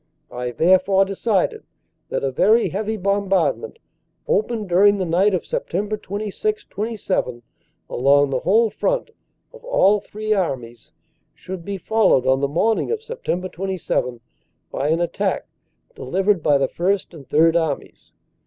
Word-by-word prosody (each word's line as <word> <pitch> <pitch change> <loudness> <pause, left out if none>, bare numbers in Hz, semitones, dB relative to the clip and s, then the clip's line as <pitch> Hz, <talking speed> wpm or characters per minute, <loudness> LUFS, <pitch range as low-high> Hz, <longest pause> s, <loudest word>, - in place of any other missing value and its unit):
I 125 0 -4
therefore 185 +7 +3
decided 195 0 -1 0.5
that - - -2
a 135 - 0
very 215 - +3
heavy 215 +2 -3
bombardment, 200 - 0 0.5
opened 240 - 0
during 200 +3 +4
the 190 - -1
night 185 +4 +2
of 175 - -2
Sept. 210 +4 -3
26 215 - -3
27 195 - -2 0.4
along 140 +2 +3
the 130 - 0
whole 220 - +3
front - - -1 0.4
of - - -14
all 210 - +3
three 215 +2 -3
Armies, 125 - -3 0.4
should 185 -2 -8
be 200 +2 -4
followed 210 - +2
on 130 0 +3
the 140 - +2
morning 210 +10 +1
of 455 -1 -2
Sept 445 - -4
27 170 -10 -2 0.5
by 140 - -2
an 165 +3 +1
attack 170 - -1 0.5
delivered 190 +6 0
by 145 -1 +3
the 135 -1 +1
First 190 +4 -1
and 145 -5 -12
Third 165 +2 +4
Armies. 160 -4 -3
190 Hz, 140 wpm, -21 LUFS, 160-210 Hz, 0.5 s, during